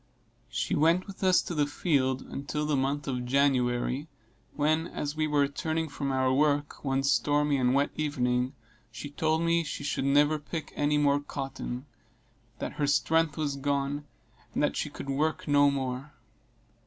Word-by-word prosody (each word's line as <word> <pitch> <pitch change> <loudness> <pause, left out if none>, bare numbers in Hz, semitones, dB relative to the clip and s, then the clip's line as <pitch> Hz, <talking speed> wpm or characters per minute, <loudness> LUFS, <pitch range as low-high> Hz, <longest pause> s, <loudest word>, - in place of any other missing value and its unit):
She - - -2
went 165 +5 +3
with 195 -1 -9
us 185 -1 +5
to - - -5
the 150 -3 +1
field 135 -4 0
until 145 +2 -4
the 150 -1 +1
month 140 +2 -1
of 125 -2 -2
January, 130 +1 +1 0.5
when, 155 +2 +1
as 145 -3 -4
we 155 0 0
were 150 -1 +2
returning 160 +3 -1
from 140 -1 -3
our 130 -1 +2
work, 145 +1 +1
one 135 -1 0
stormy 145 +1 +2
and 125 0 +2
wet 140 +1 +2
evening, 125 -3 0 0.4
she 145 - -7
told 160 +2 +1
me 170 0 +2
she 145 - -5
should 140 -1 -1
never 145 +2 +4
pick 150 +1 -6
any 145 0 +2
more 145 -1 +3
cotton 135 -2 -5 0.7
that - - -4
her 145 - +3
strength 160 +2 +2
was 145 -3 -1
gone, 140 +1 -1 0.5
and 150 - +1
she 150 - -2
could 140 - -8
work 150 +3 -1
no 145 0 +5
more. 135 +1 -3
145 Hz, 165 wpm, -29 LUFS, 135-150 Hz, 0.7 s, us